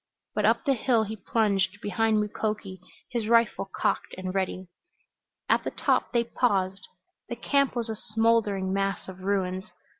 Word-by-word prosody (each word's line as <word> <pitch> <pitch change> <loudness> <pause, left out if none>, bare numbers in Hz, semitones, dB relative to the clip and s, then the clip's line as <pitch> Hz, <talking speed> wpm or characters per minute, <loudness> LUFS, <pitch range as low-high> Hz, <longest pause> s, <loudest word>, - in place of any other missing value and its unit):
But - - +1
up - - +2
the 275 - +4
hill 235 -2 +2
he 220 +1 -5
plunged 200 -1 +1
behind 215 +2 +1
Mukoki, 210 -2 -3 0.3
his 235 -4 -1
rifle 230 -4 +3
cocked - - -1
and 185 0 -4
ready. 190 -1 -2 0.8
At - - +3
the - - -2
top - - +1
they 235 -1 +2
paused. 195 -5 0 0.4
The 240 - -3
camp 280 +3 +1
was 235 -1 -1
a 220 - -3
smoldering 215 -4 +1
mass 195 0 -1
of 190 -1 -9
ruins. 190 -1 -1
210 Hz, 155 wpm, -27 LUFS, 190-230 Hz, 0.8 s, the